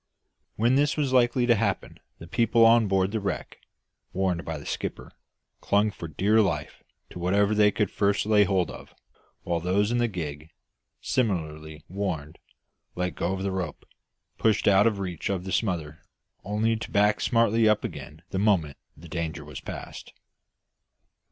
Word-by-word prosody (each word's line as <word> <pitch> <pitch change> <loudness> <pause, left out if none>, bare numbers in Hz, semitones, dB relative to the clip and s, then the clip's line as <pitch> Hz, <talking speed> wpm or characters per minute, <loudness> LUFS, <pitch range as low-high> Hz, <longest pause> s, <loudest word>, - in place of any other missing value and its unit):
When 115 +4 +2
this 145 +1 +2
was 140 -4 0
likely 120 0 +3
to 120 - +5
happen 115 0 -2 0.2
the - - -10
people 115 +5 +3
on 115 -1 +5
board 95 0 +1
the 110 - -1
wreck 100 -1 -4 0.5
warned 90 -3 0
by 80 -1 -4
their 70 - -10
skipper - - -5 0.5
clung 105 +1 +2
for 85 - -8
dear 100 +8 +2
life 85 -8 -2 0.3
to - - -8
whatever 100 +4 +2
they 105 -1 +5
could 105 -1 -1
first 100 0 +1
lay 105 -1 +5
hold 95 -3 0
of, - - -12 0.5
while 85 -1 -1
those 100 +5 +1
in 120 - +1
the 120 - +2
gig, 80 -6 -6 0.5
similarly 80 - -2
warned, 90 -6 -4 0.6
letting 90 0 -2
go 90 +3 -2
the 95 0 -2
rope, 90 -5 -4 0.5
pulled 110 -2 +2
out 100 +1 +6
of 110 -3 0
reach 90 -4 -4
of 95 -3 -2
the 95 - -6
smother, 80 -8 -2 0.4
only 110 +3 0
to 110 - -6
back 105 +1 +2
smartly 115 -2 +3
up 105 -1 +2
again - - -8
the 95 - -1
moment 90 -9 +1 0.2
the 85 - -12
danger 80 -1 -4
was 75 -2 -8
past. - - -8
100 Hz, 165 wpm, -26 LUFS, 85-110 Hz, 0.6 s, out